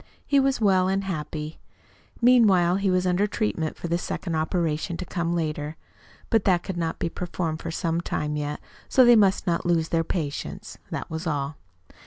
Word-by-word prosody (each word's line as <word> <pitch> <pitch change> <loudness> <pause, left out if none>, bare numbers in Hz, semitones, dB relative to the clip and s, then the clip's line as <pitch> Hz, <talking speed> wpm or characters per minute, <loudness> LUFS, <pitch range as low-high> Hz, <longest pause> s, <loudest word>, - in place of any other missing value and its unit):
He 280 - +3
was 270 0 +2
well 190 -4 +3
and 195 +1 0
happy. 155 -4 -5 0.6
Meanwhile 200 -8 +5
he 195 0 +1
was 185 0 +2
under 180 +3 +2
treatment 195 -7 -2
for - - -5
the 170 +1 0
second 175 -1 -4
operation 160 +1 -1
to 185 - -5
come 170 -1 -2
later. 155 -2 -2 0.6
But 225 -4 +3
that 180 -3 +3
could 190 - -4
not 165 -2 -2
be - - -1
performed 165 -2 -3
for - - -5
some 165 0 -1
time 150 -3 -2
yet, 150 0 -3 0.3
so 255 - +6
they 240 0 +8
must 200 -3 +3
not 170 -3 0
lose 165 -2 +1
their 165 -1 +1
patience. 155 -4 -4
That - - -5
was 160 +2 -4
all. 145 -1 -2
175 Hz, 185 wpm, -25 LUFS, 160-195 Hz, 0.6 s, they